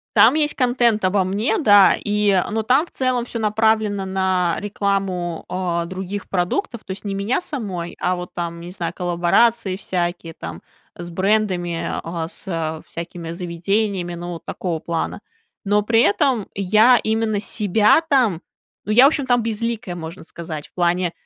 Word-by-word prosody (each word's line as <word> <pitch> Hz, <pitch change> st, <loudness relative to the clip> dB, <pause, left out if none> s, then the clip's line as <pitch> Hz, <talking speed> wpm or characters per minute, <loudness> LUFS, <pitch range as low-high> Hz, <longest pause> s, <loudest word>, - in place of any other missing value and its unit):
Там 235 Hz, -, +7 dB
есть 300 Hz, -1 st, +1 dB
контент 240 Hz, -5 st, +2 dB
обо 190 Hz, 0 st, +2 dB
мне, 205 Hz, -, 0 dB
да, 205 Hz, -, +6 dB
и, 205 Hz, -2 st, +2 dB
но 220 Hz, 0 st, -1 dB
там 260 Hz, +8 st, +3 dB
в -, -, -20 dB
целом 255 Hz, -2 st, 0 dB
всё 240 Hz, -, -6 dB
направлено 215 Hz, -2 st, +1 dB
на 190 Hz, -2 st, 0 dB
рекламу, 195 Hz, -4 st, -2 dB
э, 175 Hz, -2 st, -1 dB
других 190 Hz, +2 st, -6 dB
продуктов. 210 Hz, -, -2 dB
То -, -, -8 dB
есть 195 Hz, +2 st, -7 dB
не 200 Hz, -, -2 dB
меня 200 Hz, +6 st, 0 dB
самой, 195 Hz, -, -5 dB
а 180 Hz, +1 st, +1 dB
вот 180 Hz, 0 st, -7 dB
там, 170 Hz, -1 st, -4 dB
не 175 Hz, -, -8 dB
знаю, 170 Hz, -2 st, -4 dB
коллаборации 185 Hz, +4 st, +2 dB
всякие 175 Hz, -3 st, -3 dB
там 80 Hz, -, -8 dB, 0.3 s
с 175 Hz, 0 st, -7 dB
брендами, 175 Hz, -4 st, -1 dB
э, -, -, -7 dB
с, -, -, -7 dB
э, 160 Hz, -3 st, -3 dB
всякими 170 Hz, 0 st, -7 dB
заведениями. 180 Hz, +1 st, -2 dB
Ну 175 Hz, +1 st, -6 dB
вот 165 Hz, -, -10 dB
такого 170 Hz, -4 st, -3 dB
плана. 170 Hz, +5 st, -3 dB, 0.4 s
Но 205 Hz, +1 st, +3 dB
при 225 Hz, +2 st, +3 dB
этом 215 Hz, +1 st, +2 dB
я 215 Hz, +6 st, +5 dB
именно 220 Hz, -1 st, 0 dB
себя 210 Hz, -, +3 dB
там 255 Hz, -, +1 dB, 0.4 s
Ну, 215 Hz, -, 0 dB
я, 245 Hz, -, +7 dB
в -, -, +9 dB
общем, 290 Hz, -3 st, -2 dB
там 245 Hz, -2 st, +2 dB
безликая, 225 Hz, -4 st, -3 dB
можно 165 Hz, +1 st, -8 dB
сказать, 160 Hz, -3 st, -7 dB
в -, -, -47 dB
плане, 175 Hz, 0 st, +1 dB
195 Hz, 165 wpm, -21 LUFS, 175-220 Hz, 0.4 s, в